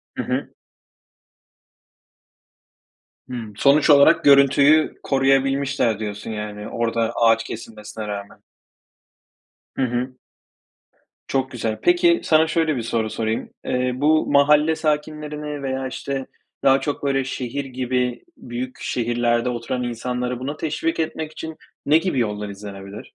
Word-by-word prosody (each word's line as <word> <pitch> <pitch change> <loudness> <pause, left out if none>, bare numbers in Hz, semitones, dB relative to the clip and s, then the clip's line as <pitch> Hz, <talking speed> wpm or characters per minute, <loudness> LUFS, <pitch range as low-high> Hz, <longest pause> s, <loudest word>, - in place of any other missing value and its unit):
Hı - - -2
hı. - - -2 2.8
Hımm. 115 -4 -6
Sonuç 145 +2 +4
olarak 140 -1 +6
görüntüyü 140 +2 +5
koruyabilmişler 135 -3 +1
diyorsun 105 0 -5
yani, 105 -1 -5
orada 115 -1 -1
ağaç 115 -1 +4
kesilmesine 110 -1 -8
rağmen. 100 -1 -6 1.4
Hı - - -2
hı. 125 +1 -2 1.1
Çok 135 -1 -1
güzel. 115 -3 -3
Peki, 350 -1 +4
sana 160 0 +4
şöyle 160 -3 +1
bir 120 - -2
soru 110 -1 -1
sorayım: 110 +1 -2 0.2
Eee, 125 0 0
bu 155 +3 +3
mahalle 150 +2 +4
sakinlerini 150 -1 -3
veya, 130 0 -2
işte, 135 +1 -4 0.4
daha 135 0 +5
çok, 145 +1 -3
böyle, 135 -1 +1
şehir 135 +1 -4
gibi 125 -1 -2
büyük 125 +1 -6
şehirlerde 120 0 0
oturan 125 +1 -3
insanları 125 +1 -3
buna 145 +4 -4
teşvik 165 +1 -2
etmek 160 -1 -3
için 160 0 -7 0.3
ne 150 +2 +5
gibi 165 -6 -1
yollar 105 -2 -2
izlenebilir? 100 0 -9
130 Hz, 120 wpm, -22 LUFS, 115-145 Hz, 2.8 s, olarak